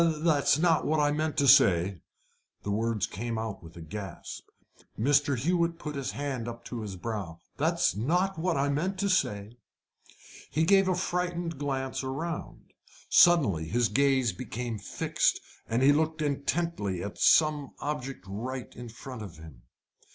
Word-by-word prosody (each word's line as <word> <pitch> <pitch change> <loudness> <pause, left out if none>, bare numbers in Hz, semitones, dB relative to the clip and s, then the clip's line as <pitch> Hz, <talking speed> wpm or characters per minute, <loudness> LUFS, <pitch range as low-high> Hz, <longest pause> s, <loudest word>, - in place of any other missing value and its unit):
"That's 155 -3 +2
not 165 0 +3
what 155 0 +1
I 145 0 +3
meant 155 +1 -1
to 140 - +3
say." 90 -5 +5 0.6
The 100 - -2
words 110 -2 0
came 115 +3 -4
out 110 -3 -4
with 85 0 -13
a - - -8
gasp. 95 +2 -8 0.5
Mr. 140 +3 +2
Hewett 170 +5 +1
put 150 -3 -6
his 135 -3 -3
hand 135 -5 -3
up 115 0 -8
to 120 -2 -5
his 100 -3 -6
brow. 95 -4 -5 0.2
"That's - - +1
not 175 - 0
what 170 -2 0
I 140 +1 +1
meant 175 +7 -1
to 200 - +1
say." 110 - -1 0.9
He 155 - +1
gave 195 +3 +4
a 185 - +2
frightened 175 -3 -2
glance 135 -2 -2
around. 155 +6 -5 0.4
Suddenly 130 - +5
his 120 +4 +1
gaze 135 -3 +2
became 120 -2 -5
fixed, - - 0 0.3
and 115 +3 +1
he 140 - +7
looked 160 +1 0
intently 140 - -1
at 100 - -7
some 150 -3 +4
object 135 -8 -4
right 125 +6 -5
in 120 0 -8
front 125 +1 -9
of 95 -7 -9
him. 80 -6 -13
135 Hz, 160 wpm, -28 LUFS, 110-155 Hz, 0.9 s, he